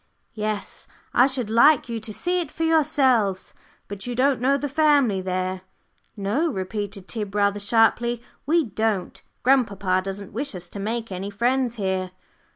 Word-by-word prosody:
"Yes, 215 -1 -4 0.3
I 250 - +6
should 255 -5 -2
like 250 +5 +5
you 230 -1 -3
to 220 0 -5
see 355 - -1
it 315 -4 -6
for 325 - -4
yourselves. 270 -11 +2 0.3
But 200 +2 -7
you 245 - -3
don't 265 0 +2
know 275 +2 +3
the 290 - -3
family 285 -8 +3
there?" 185 0 -2 0.6
"No," 220 +12 0
repeated 200 -1 -5
Tib, 210 -3 -4
rather 200 0 +2
sharply, 230 +3 +2 0.3
"we 330 +1 +3
don't. 215 -3 -2 0.2
Grandpapa 200 -8 +2
doesn't 195 +1 -6
wish 270 +1 -3
us 175 -1 -8
to 200 - -7
make 225 +2 -3
any 190 +2 -4
friends 240 +3 0
here." 190 -3 -2
220 Hz, 160 wpm, -24 LUFS, 195-265 Hz, 0.6 s, I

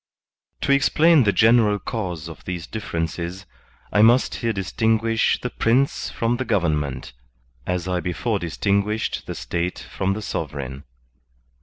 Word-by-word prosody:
To - - +1
EXPLAIN 150 +1 +5
the 100 - +4
general 110 -1 +4
cause 90 -8 -4
of 80 -2 -11
these 90 -2 -4
differences, 85 -2 -4 0.5
I 105 - +4
must 120 +4 +5
here 115 -2 -1
distinguish 110 +3 +1
the 125 - -4
Prince 130 +5 +1
from 115 +1 -1
the 130 - -1
government, 75 - -1 0.5
as 90 0 -1
I 90 -1 0
before 100 +5 -1
distinguished 100 +5 -1
the - - -4
State 85 +1 -3
from 95 0 -2
the 110 +2 -5
sovereign. 70 -6 -5
100 Hz, 135 wpm, -23 LUFS, 85-115 Hz, 0.5 s, EXPLAIN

